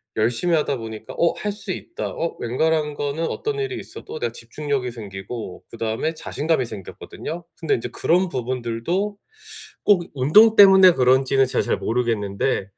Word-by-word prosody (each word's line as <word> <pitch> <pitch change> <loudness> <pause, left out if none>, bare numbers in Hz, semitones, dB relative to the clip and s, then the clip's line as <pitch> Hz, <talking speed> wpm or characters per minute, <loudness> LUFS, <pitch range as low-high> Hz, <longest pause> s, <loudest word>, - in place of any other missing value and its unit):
열심히 120 +10 +2
하다 145 -3 0
보니까 110 -1 -8
'어 170 - +3
할 210 - -2
수 210 -2 -4
있다.' 345 - -5
어 165 - -4
웬만한 150 +5 0
거는 145 +3 -2
어떤 435 0 -3
일이 405 -2 -3
있어도 455 +3 -8
내가 470 0 -1
집중력이 140 - -3
생기고 100 -2 -7
그다음에 115 +7 -2
자신감이 155 -3 -1
생겼거든요. 115 - -8
근데 160 - +1
인제 120 - -4
그런 180 +8 +1
부분들도 130 - -2 0.7
꼭 190 -4 +5
운동 210 - +6
때문에 190 -2 +9
그런지는 130 +1 +3
제가 - - 0
잘 - - 0
모르겠는데 110 -3 -1
140 Hz, 355 characters per minute, -22 LUFS, 115-175 Hz, 0.7 s, 때문에